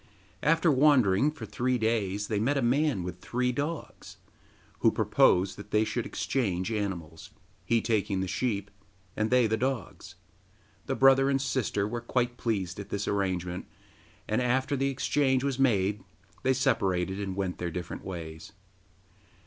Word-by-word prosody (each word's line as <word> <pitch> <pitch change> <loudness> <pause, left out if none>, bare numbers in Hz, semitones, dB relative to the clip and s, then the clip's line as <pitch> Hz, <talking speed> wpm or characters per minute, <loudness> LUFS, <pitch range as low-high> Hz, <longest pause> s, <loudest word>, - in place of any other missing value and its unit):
After 165 +2 +3
wandering 130 -5 +4
for 150 0 -8
three 125 +1 0
days 105 -3 0
they 105 - -1
met 135 +7 +1
a 135 - +1
man 135 - +2
with 90 0 -7
three 125 +1 -1
dogs 145 +5 -5 0.6
who - - +5
proposed 95 +2 +3
that 100 0 -10
they 105 0 +3
should - - -2
exchange 95 -7 -1
animals, 95 -7 -4 0.4
he 115 -1 +2
taking 105 -4 0
the 95 - -1
sheep, 100 -1 -2 0.4
and 110 +1 0
they 125 -1 +4
the 110 0 +1
dogs. 120 -7 -4 0.7
The - - -1
brother 135 0 +5
and 135 -1 +2
sister 125 -6 -1
were 120 +2 -4
quite 120 0 -1
pleased 100 -7 -2
at 100 - -7
this 100 0 -3
arrangement, 90 -3 -2 0.6
and 110 +3 +1
after 130 +3 +1
the 135 0 0
exchange 130 0 +1
was 135 -2 -1
made 105 -6 +2 0.4
they 130 - +2
separated, 95 -7 0
and 95 -2 -3
went 95 -2 -3
their 85 - -2
different 90 +1 -6
ways. 80 -4 -7
110 Hz, 155 wpm, -28 LUFS, 95-130 Hz, 0.7 s, who